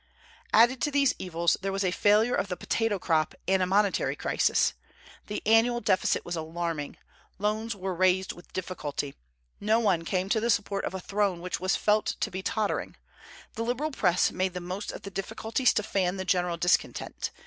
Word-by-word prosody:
Added 240 Hz, +3 st, +5 dB
to -, -, +1 dB
these 280 Hz, -2 st, +3 dB
evils, 170 Hz, -1 st, +1 dB
there 195 Hz, 0 st, -2 dB
was 195 Hz, +1 st, -1 dB
a 185 Hz, -, +1 dB
failure 210 Hz, +6 st, +3 dB
of 200 Hz, -, 0 dB
the 180 Hz, -2 st, -4 dB
potato 225 Hz, -3 st, 0 dB
crop 160 Hz, -4 st, 0 dB
and 190 Hz, 0 st, +3 dB
a 185 Hz, -, +2 dB
monetary 200 Hz, +1 st, +2 dB
crisis. -, -, +1 dB, 0.5 s
The 210 Hz, -, -4 dB
annual 225 Hz, +3 st, +4 dB
deficit 205 Hz, -5 st, +1 dB
was 175 Hz, -, -3 dB
alarming. 160 Hz, -2 st, -4 dB, 0.4 s
Loans 215 Hz, +2 st, -1 dB
were 190 Hz, -1 st, -3 dB
raised 185 Hz, +1 st, +2 dB
with 175 Hz, -, -16 dB
difficulty. 150 Hz, -6 st, -4 dB, 0.5 s
No 220 Hz, +2 st, +2 dB
one 190 Hz, -7 st, +2 dB
came 185 Hz, +2 st, -1 dB
to 220 Hz, -, +2 dB
the 230 Hz, +2 st, -1 dB
support 200 Hz, -2 st, 0 dB
of 190 Hz, -, -4 dB
a -, -, -3 dB
throne 195 Hz, -1 st, 0 dB
which 180 Hz, +1 st, -4 dB
was 185 Hz, +2 st, +1 dB
felt 210 Hz, 0 st, +1 dB
to -, -, -1 dB
be 190 Hz, +1 st, -4 dB
tottering. 215 Hz, +2 st, -2 dB, 0.6 s
The -, -, -5 dB
liberal 250 Hz, +7 st, -1 dB
Press 180 Hz, -9 st, +2 dB
made 185 Hz, -1 st, -1 dB
the -, -, -2 dB
most 185 Hz, +4 st, -5 dB
of -, -, -9 dB
the 200 Hz, -, -7 dB
difficulties 220 Hz, +6 st, 0 dB
to 210 Hz, -, +1 dB
fan 195 Hz, -2 st, 0 dB
the 190 Hz, -, -4 dB
general 180 Hz, -2 st, +1 dB
discontent. 175 Hz, +1 st, 0 dB
195 Hz, 190 wpm, -28 LUFS, 180-215 Hz, 0.6 s, Added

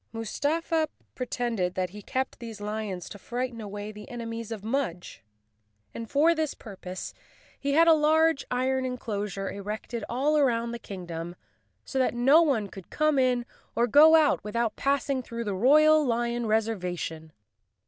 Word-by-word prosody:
Mus¬ 225 Hz, -1 st, -5 dB
tafa 320 Hz, +2 st, +1 dB, 0.3 s
pretended 235 Hz, -7 st, -2 dB
that 185 Hz, -2 st, -1 dB
he 210 Hz, +1 st, -9 dB
kept 260 Hz, +6 st, -3 dB
these 225 Hz, -3 st, -8 dB
lions 205 Hz, -3 st, -4 dB
to 205 Hz, -, -10 dB
frighten 240 Hz, +1 st, -4 dB
away 205 Hz, 0 st, -6 dB
the 210 Hz, 0 st, -11 dB
enemies 230 Hz, -2 st, -6 dB
of 215 Hz, -3 st, -5 dB
Mudge, 220 Hz, -7 st, -3 dB, 0.7 s
and 230 Hz, -1 st, -7 dB
for 310 Hz, +4 st, +4 dB
this 315 Hz, -3 st, -2 dB
purpose 185 Hz, -4 st, -8 dB, 0.5 s
he 280 Hz, 0 st, -1 dB
had 330 Hz, +3 st, +5 dB
a 330 Hz, -, +8 dB
large 315 Hz, -1 st, +3 dB
iron 260 Hz, +1 st, 0 dB
enclosure 210 Hz, -6 st, -3 dB
erected 210 Hz, +3 st, -5 dB
all 285 Hz, +5 st, +2 dB
around 235 Hz, -4 st, +1 dB
the 235 Hz, -, -5 dB
king¬ 190 Hz, -5 st, -8 dB
dom, 170 Hz, +1 st, -6 dB, 0.5 s
so 265 Hz, -, -2 dB
that 255 Hz, -1 st, +1 dB
no 270 Hz, +7 st, +6 dB
one 265 Hz, -11 st, +1 dB
could 190 Hz, -3 st, -12 dB
come 305 Hz, -2 st, +2 dB
in 250 Hz, -2 st, +2 dB, 0.3 s
or 235 Hz, -, +3 dB
go 300 Hz, +6 st, +7 dB
out 310 Hz, -7 st, +3 dB
without 225 Hz, +2 st, -1 dB
passing 275 Hz, -1 st, 0 dB
through 235 Hz, -1 st, -5 dB
the 205 Hz, -3 st, -2 dB
royal 305 Hz, +9 st, +5 dB
lion 240 Hz, -2 st, -1 dB
reservation. 180 Hz, -7 st, -2 dB
235 Hz, 160 wpm, -27 LUFS, 210-275 Hz, 0.7 s, a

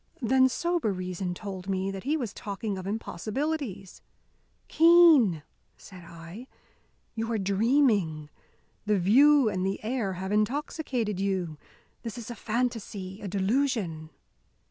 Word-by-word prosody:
Then 260 Hz, +2 st, +4 dB
sober 340 Hz, -5 st, -1 dB
reason 185 Hz, -1 st, -4 dB
told 190 Hz, -1 st, -7 dB
me 190 Hz, 0 st, -1 dB
that 195 Hz, +2 st, -8 dB
he 300 Hz, +3 st, +1 dB
was 240 Hz, -8 st, -4 dB
talking 205 Hz, 0 st, -4 dB
of 185 Hz, 0 st, -6 dB
impossibilities. 220 Hz, -, -4 dB, 0.7 s
"Keene," 320 Hz, -, +6 dB, 0.3 s
said 185 Hz, -2 st, -13 dB
I, 170 Hz, +8 st, -11 dB, 0.7 s
"you 225 Hz, 0 st, -3 dB
are 225 Hz, -, 0 dB
dreaming. 200 Hz, -, +1 dB, 0.6 s
The 210 Hz, -1 st, +3 dB
view 265 Hz, +8 st, +5 dB
and 190 Hz, -3 st, -1 dB
the 195 Hz, +1 st, -1 dB
air 220 Hz, -4 st, -2 dB
have 190 Hz, +2 st, -5 dB
intoxicated 230 Hz, -, -1 dB
you. 185 Hz, -6 st, -2 dB, 0.4 s
This 230 Hz, 0 st, -6 dB
is 240 Hz, 0 st, -7 dB
a -, -, -6 dB
phantasy, 220 Hz, -5 st, -3 dB
a 205 Hz, -, -5 dB
delusion!" 195 Hz, -, -1 dB
210 Hz, 125 wpm, -27 LUFS, 190-250 Hz, 0.7 s, Keene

